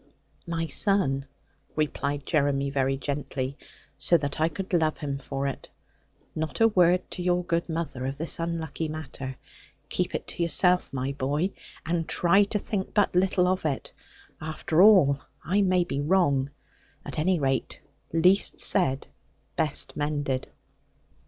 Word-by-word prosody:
'My 165 -1 -2
son,' 150 -8 +1 0.5
replied 145 -2 -2
Jeremy 140 -3 +1
very 135 -1 0
gently, 140 -1 -4 0.4
so 160 +4 +5
that 145 0 -4
I 160 - +3
could 190 +2 -6
love 160 -3 +2
him 140 -2 -4
for 135 0 -4
it, 140 - -5 0.6
'not 155 -2 -4
a 225 - +6
word 180 -3 +3
to 180 - -4
your 180 0 +1
good 170 0 -1
mother 160 -6 -3
of 135 +1 -4
this 165 +2 -2
unlucky 165 -2 -3
matter. 140 -4 -6 0.5
Keep - - -1
it - - -4
to - - -4
yourself, 180 +2 +3
my 130 0 -2
boy, 145 +7 -1 0.3
and 165 0 -1
try 195 +4 +4
to 210 - -2
think 200 -1 -4
but 205 -2 +3
little 180 0 +3
of 185 0 0
it. 145 -4 -3 0.5
After 160 +1 0
all, 185 -10 +6 0.3
I 190 +6 +2
may 185 -2 +3
be 140 -4 -3
wrong: 145 -5 +2 0.6
at - - -5
any 180 +3 +2
rate, 135 -3 -1 0.3
least 180 +5 +3
said 135 -8 +4 0.5
best 150 -2 +1
mended.' 145 -3 -2
155 Hz, 145 wpm, -26 LUFS, 140-180 Hz, 0.6 s, a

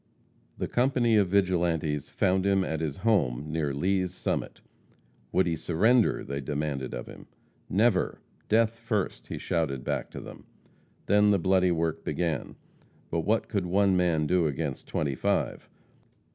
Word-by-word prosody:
The - - -2
company 120 -2 +2
of 100 -3 +4
vigilantes 85 -6 +1
found 95 0 +1
him 100 -1 +2
at 80 -3 -2
his 75 -3 -3
home 75 - +1
near 80 -3 -1
Lea's 90 +5 0
Summit. - - -3 0.7
Would 95 - +3
he 85 -2 0
surrender? 105 +9 +2
they 70 +1 -4
demanded 70 -2 -3
of - - -5
him. - - -12 0.4
"Never! 100 0 +2 0.3
death 115 +1 +2
first," 110 -4 -2
he - - -5
shouted 75 -7 -1
back - - -2
to - - -8
them. - - -11 0.6
Then 105 +1 +4
the 100 - +4
bloody 95 0 +3
work 80 -1 -1
began. 85 -3 -2 0.6
But 85 - 0
what 105 +7 0
could 100 -4 -2
one 95 +1 +3
man 85 -4 +2
do 90 0 +2
against 75 -1 -4
twenty 70 -3 -1
five? - - -1
90 Hz, 150 wpm, -28 LUFS, 75-100 Hz, 0.7 s, of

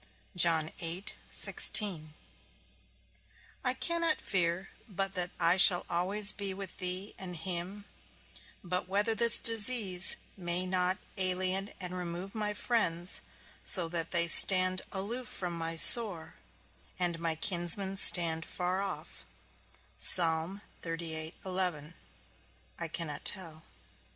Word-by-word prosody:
I 165 +1 +1 2.8
cannot 335 -2 -1
fear 180 0 -3 0.2
but 195 0 -3
that 180 -2 -1
I 170 +1 +1
shall 180 -1 +6
always 195 +4 +3
be 200 -2 -6
with 195 -1 -9
thee 185 +2 -1
and 180 -2 -6
him; 180 +4 -5 0.8
but 180 0 -4
whether 205 +4 -1
this 230 +2 +1
disease 215 -5 +2 0.2
may 175 -1 0
not 185 0 0 0.2
alien 185 +1 +4
and 180 -1 -3
remove 180 +2 -7
my 210 -1 -3
friends, 180 -7 -1 0.4
so 175 -4 +3
that 165 -1 -1
they 170 -1 0
stand 185 +2 +4
aloof 220 +6 -5
from 180 -4 -4
my 165 0 -2
sore, 180 -2 +5 0.6
and 175 -2 -4
my 165 -1 -4
kinsmen 180 +3 -2
stand 170 -5 +3
afar 180 +1 -4
off, 200 - -8 0.9
I 165 +2 -1 2.3
cannot 160 -4 -6
tell. 165 -5 -5
185 Hz, 100 wpm, -29 LUFS, 170-195 Hz, 2.8 s, shall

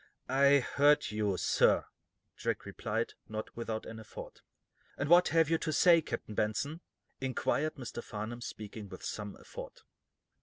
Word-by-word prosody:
"I 140 +1 +5
heard 145 +2 +3
you, 105 -3 0
sir," - - +3 0.5
Jack - - -2
replied, - - -2 0.2
not 110 0 -5
without 115 -2 -3
an 110 0 -8
effort. 110 - -10 0.6
"And 140 - -1
what 175 +1 +7
have 165 -1 +4
you 165 +1 +2
to 155 - -1
say, 170 +2 +6
Captain 115 -6 -5
Benson?" 125 +11 -1 0.4
inquired 135 +3 0
Mr. 125 -3 -6
Farnum, 110 +3 -5
speaking 105 -2 -7
with 95 - -10
some 105 -2 -5
effort. - - -10
120 Hz, 145 wpm, -32 LUFS, 110-150 Hz, 0.6 s, what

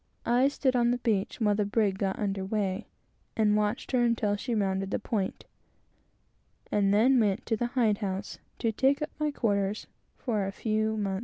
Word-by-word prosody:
I 245 +3 +4
stood 270 -2 0
on 240 -1 +3
the 245 - +2
beach 215 -4 -1
while 210 -3 +3
the 210 +1 +1
brig 205 -2 0
got 195 -1 -1
under 195 -2 -2
weigh, 195 0 -2 0.5
and 210 -1 +3
watched 210 +2 -1
her 255 -2 +3
until 225 -3 +1
she 235 +3 -3
rounded 195 -2 0
the - - 0
point, 205 -3 -3 1.3
and 200 -1 +2
then 245 +6 +5
went 210 0 +1
up - - -35
to 225 - 0
the 240 - 0
hide 235 -5 +1
house 195 -1 -4 0.2
to 225 - 0
take 270 +6 +2
up 300 - -5
my 300 0 +1
quarters 205 -6 -1 0.3
for 215 -6 -1
a - - -3
few 220 +1 -1
months. 195 -2 -1
215 Hz, 190 wpm, -28 LUFS, 200-240 Hz, 1.3 s, then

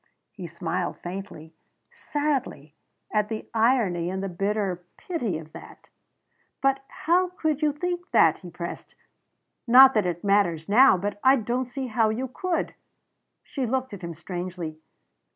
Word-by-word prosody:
He 185 -4 -8
smiled 170 +2 -3
faintly, 175 -3 -8 0.4
sadly, 275 - -3 0.4
at 210 -1 +1
the 220 -1 -5
irony 220 -7 +2
and 190 +1 -3
the 195 - -2
bitter 195 0 -2
pity 240 - -3
of 155 -1 -11
that. - - -13 0.7
"But 270 0 +1
how 355 +3 +1
could 315 -4 -2
you 300 -1 +3
think 355 +4 -4
that?" - - +4
he - - -10
pressed. - - -7 0.7
"Not 260 +3 +9
that 210 -4 +2
it 175 -1 -3
matters 195 -6 +2
now 240 +1 +6
but 205 +2 -4
I 265 +1 +7
don't 245 +1 -2
see 265 +1 -4
how 225 -2 +1
you 245 +5 -2
could." 355 +7 -2 0.7
She 265 -4 -3
looked 260 0 -2
at 200 - -8
him 170 -2 -6
strangely. 175 -2 -6
215 Hz, 150 wpm, -25 LUFS, 180-265 Hz, 0.7 s, Not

